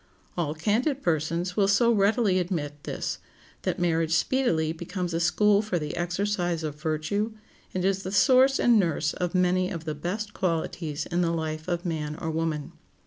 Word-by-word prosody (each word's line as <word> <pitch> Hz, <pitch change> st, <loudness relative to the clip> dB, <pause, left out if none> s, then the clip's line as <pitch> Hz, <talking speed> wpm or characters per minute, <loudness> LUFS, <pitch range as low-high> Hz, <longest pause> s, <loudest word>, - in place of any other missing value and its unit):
All 160 Hz, -3 st, -1 dB
candid 240 Hz, -, 0 dB
persons 170 Hz, +2 st, 0 dB
will 200 Hz, -2 st, +3 dB
so 215 Hz, +4 st, +4 dB
readily 205 Hz, -2 st, +3 dB
admit 150 Hz, -5 st, -3 dB
this, -, -, -3 dB, 0.4 s
that -, -, -1 dB
marriage 165 Hz, -2 st, +1 dB
speedily 160 Hz, -6 st, +1 dB
becomes 175 Hz, +1 st, -4 dB
a 165 Hz, -, 0 dB
school 200 Hz, +5 st, +3 dB
for 210 Hz, -4 st, -2 dB
the 150 Hz, -2 st, -4 dB
exercise 175 Hz, -1 st, -1 dB
of 150 Hz, -1 st, -5 dB
virtue, 165 Hz, +8 st, -1 dB, 0.4 s
and 185 Hz, 0 st, 0 dB
is 195 Hz, 0 st, +1 dB
the 190 Hz, -, -5 dB
source 260 Hz, +5 st, +5 dB
and 235 Hz, -2 st, +5 dB
nurse 165 Hz, -4 st, 0 dB
of 180 Hz, 0 st, -3 dB
many 185 Hz, 0 st, +2 dB
of 165 Hz, -3 st, -6 dB
the 155 Hz, -, -2 dB
best 195 Hz, +8 st, -4 dB
qualities 165 Hz, -3 st, -2 dB
in 175 Hz, 0 st, -1 dB
the 170 Hz, -, +2 dB
life 160 Hz, -1 st, -3 dB
of 175 Hz, 0 st, -2 dB
man 155 Hz, -3 st, -2 dB
or 160 Hz, -, -3 dB
woman. 160 Hz, -2 st, -2 dB
175 Hz, 175 wpm, -27 LUFS, 160-200 Hz, 0.4 s, source